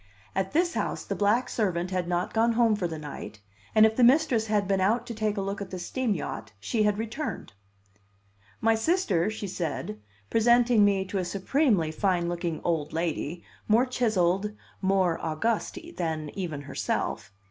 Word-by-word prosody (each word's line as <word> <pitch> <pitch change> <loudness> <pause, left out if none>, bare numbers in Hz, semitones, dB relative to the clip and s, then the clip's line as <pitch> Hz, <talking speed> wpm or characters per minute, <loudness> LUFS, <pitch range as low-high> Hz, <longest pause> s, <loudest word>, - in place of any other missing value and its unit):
At 190 0 -1
this 345 +2 +2
house - - -2
the - - -2
black 220 +5 +2
servant 185 -6 -1
had 180 -2 -1
not 175 0 -1
gone 230 +1 +3
home 230 -2 +4
for 190 -4 -1
the 160 -1 -5
night, 145 -7 -8 0.4
and 215 0 +8
if 220 0 +2
the 250 - +3
mistress 250 -3 +4
had 210 -2 +1
been 195 -1 +1
out 225 +6 +2
to 240 - -5
take 215 -1 -1
a - - 0
look 195 +1 -3
at 195 - -5
the 185 - -5
steam 220 +5 -1
yacht, 115 -9 -5
she 215 - -1
had 210 -1 +2
returned. 225 - -4 1.1
"My 225 0 +4
sister," 225 - +1
she 215 -1 -5
said, 160 - -4 0.3
presenting 235 0 +5
me 195 -2 +3
to 195 +1 -2
a - - 0
supremely 195 - +1
fine 175 +1 +1
looking 170 -2 -3
old 160 -3 -1
lady, 165 0 -2 0.2
more 225 +4 +4
chiselled, 210 -5 +1 0.3
more 190 -3 +2
august, 205 - -1 0.2
than 160 -3 -2
even 165 -7 -4
herself. 100 -7 -3
195 Hz, 175 wpm, -27 LUFS, 170-225 Hz, 1.1 s, and